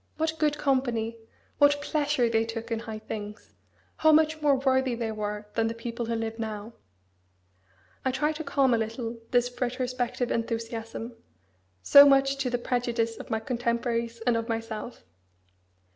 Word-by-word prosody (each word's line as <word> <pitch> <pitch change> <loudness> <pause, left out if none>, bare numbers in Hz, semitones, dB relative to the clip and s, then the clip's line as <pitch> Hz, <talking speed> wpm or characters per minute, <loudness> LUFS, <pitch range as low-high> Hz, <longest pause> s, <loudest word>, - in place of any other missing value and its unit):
What 320 0 -1
good 300 -1 +2
company! 240 -5 0 0.4
What 290 0 +5
pleasure 290 -4 +1
they 225 -1 +2
took 230 0 -6
in 225 - 0
high 225 -2 -6
things! 210 0 -8 0.4
How 315 - +5
much 310 0 +3
more 290 -2 +4
worthy 260 -1 +1
they 230 -1 -3
were 210 -1 -4
than 225 -1 +1
the 225 - -3
people 230 0 -5
who 230 - -1
live 225 0 -4
now!" 220 0 -5 1.3
I - - +1
tried 295 +4 0
to 315 - -4
calm 275 -3 +2
a 230 - +2
little 230 +1 -4
this 245 0 +1
retrospective 250 0 -1
enthusiasm, 230 0 -4 0.7
so 280 - +9
much 275 0 +3
to 270 -2 -1
the 245 - 0
prejudice 240 -2 -1
of - - -9
my 220 - 0
contemporaries 235 -1 -2
and 235 +1 +2
of 230 +1 -2
myself. 225 +1 -5
235 Hz, 160 wpm, -27 LUFS, 225-265 Hz, 1.3 s, so